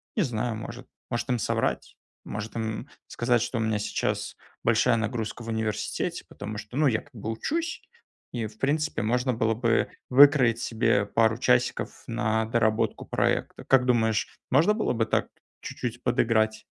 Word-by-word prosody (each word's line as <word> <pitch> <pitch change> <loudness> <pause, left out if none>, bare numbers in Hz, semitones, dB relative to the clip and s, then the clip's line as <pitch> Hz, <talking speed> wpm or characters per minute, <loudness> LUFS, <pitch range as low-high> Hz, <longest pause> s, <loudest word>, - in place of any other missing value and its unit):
не 210 - +2
знаю, 120 -3 -2
может, 115 +3 -8 0.2
может 120 +1 -2
им 125 - +1
соврать? - - -1 0.3
Может 105 +3 -6
им, 115 - -1 0.2
м, 135 - -14 0.2
сказать, 120 -1 +1
что 120 +1 -2
у 115 - 0
меня 110 -1 0
сейчас - - -2 0.3
большая 120 +1 +3
нагрузка 115 +1 -3
в 115 - -7
университете. 110 -1 -2
Потому 105 +1 -7
что, 110 +5 -7
ну, 150 -1 +4
я, 110 -4 +1
как 145 - -23
бы, 110 0 -4
учусь, 320 - -2 0.5
и 115 -3 -2
в 105 0 -16
принципе 150 +1 0
можно 125 +4 +1
было 115 0 +1
бы 115 0 +1 0.2
выкроить 130 -3 +6
себе 110 -3 +1
пару 110 +2 +2
часиков 125 0 +1
на 110 -2 0
доработку 110 -1 +1
проекта. - - -1
Как 130 -2 +4
думаешь, 110 -3 +2 0.2
можно 160 +11 +5
было 215 - 0
бы 115 -2 +1
так - - 0 0.3
чуть-чуть 120 -1 -5
подыграть? 110 -3 +2
115 Hz, 165 wpm, -27 LUFS, 110-125 Hz, 0.5 s, выкроить